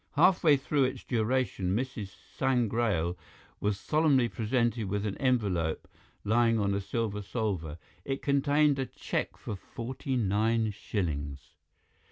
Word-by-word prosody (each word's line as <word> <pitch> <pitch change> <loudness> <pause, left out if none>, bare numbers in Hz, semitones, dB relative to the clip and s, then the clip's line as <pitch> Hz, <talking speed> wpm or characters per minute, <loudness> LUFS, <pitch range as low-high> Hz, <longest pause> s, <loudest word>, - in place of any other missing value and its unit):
Halfway 170 -6 +5
through 135 0 +1
its 130 - -3
duration 110 -5 0
Mrs. 115 -5 -4 0.2
Sangrail 115 -9 +1 0.4
was 105 -1 0
solemnly 145 -4 +3
presented 115 0 0
with 100 +1 -1
an 100 - -2
envelope 100 -11 0 0.4
lying 115 +1 +3
on 100 -2 +1
a 100 - 0
silver 105 0 -2
salver. 95 -7 -3 0.3
It 135 0 -3
contained 145 0 +3
a 135 - -1
cheque - - -3
for 105 - -5
forty 130 +6 -5
nine 110 0 +1
shillings. 75 -9 -4
115 Hz, 125 wpm, -30 LUFS, 100-130 Hz, 0.4 s, Halfway